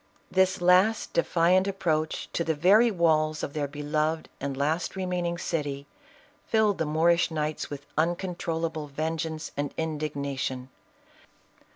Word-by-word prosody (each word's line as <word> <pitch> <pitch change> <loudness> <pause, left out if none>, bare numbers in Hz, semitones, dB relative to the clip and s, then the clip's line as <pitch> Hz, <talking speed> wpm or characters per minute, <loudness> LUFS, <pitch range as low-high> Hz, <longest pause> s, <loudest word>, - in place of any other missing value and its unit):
This 190 -1 +2
last 185 +5 +4
defiant 175 +3 +3
approach 160 -5 -1
to 170 - 0
the 160 -1 0
very 200 +10 +5
walls 155 -5 +1
of 140 - -4
their 145 -2 -1
U'l 145 0 -7
ived 155 +1 +1
and 140 -1 -4
last 155 +7 -1
remaining 180 -2 -2
city, 145 -4 -3 0.6
filled 215 -3 +2
the 160 - 0
Moorish 170 +3 +3
knights 155 -1 -3
with 145 -1 -7
uncontrollable 165 -2 -2
vengeance 160 +2 -3
and 145 0 -3
indigna 150 -3 -3
tion. 130 0 -3
160 Hz, 135 wpm, -27 LUFS, 150-175 Hz, 0.6 s, very